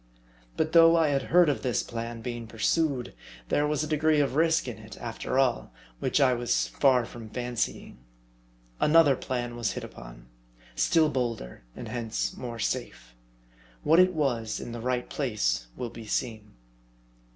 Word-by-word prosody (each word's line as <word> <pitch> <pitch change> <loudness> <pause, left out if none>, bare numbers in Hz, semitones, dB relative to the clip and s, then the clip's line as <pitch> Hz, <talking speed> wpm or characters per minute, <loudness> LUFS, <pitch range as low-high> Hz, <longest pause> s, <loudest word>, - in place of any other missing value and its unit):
But 160 0 0
though 165 0 +7
I 160 -2 +3
had 140 -1 +1
heard 175 0 +6
of 145 - 0
this 125 -3 0
plan 115 0 -6
being 120 -2 -5
pursued, 130 +3 0 0.4
there 150 - +2
was 150 0 0
a - - -3
degree 155 0 +2
of 140 -3 +1
risk 160 0 +2
in 120 -3 -6
it, 110 0 -11
after 115 +2 -4
all, 130 - +1 0.3
which - - +1
I 130 -3 +4
was 120 0 0
far 130 -4 +3
from 115 -2 -10
fancying. 120 - -3 0.8
Another 150 -3 +5
plan 120 -2 -4
was 120 -2 -1
hit - - -6
upon; - - -11 0.5
still 160 -2 +3
bolder; 115 - -3
and - - -7
hence 115 -3 -3
more 120 -2 -6
safe. - - -4 0.7
What 160 +3 +5
it 185 -1 +4
was, 120 -8 -1
in - - -7
the 120 0 -6
right 125 0 -1
place 60 - -1
will 120 -2 -4
be 115 -2 -10
seen. 110 -1 -3
125 Hz, 160 wpm, -27 LUFS, 115-150 Hz, 0.8 s, though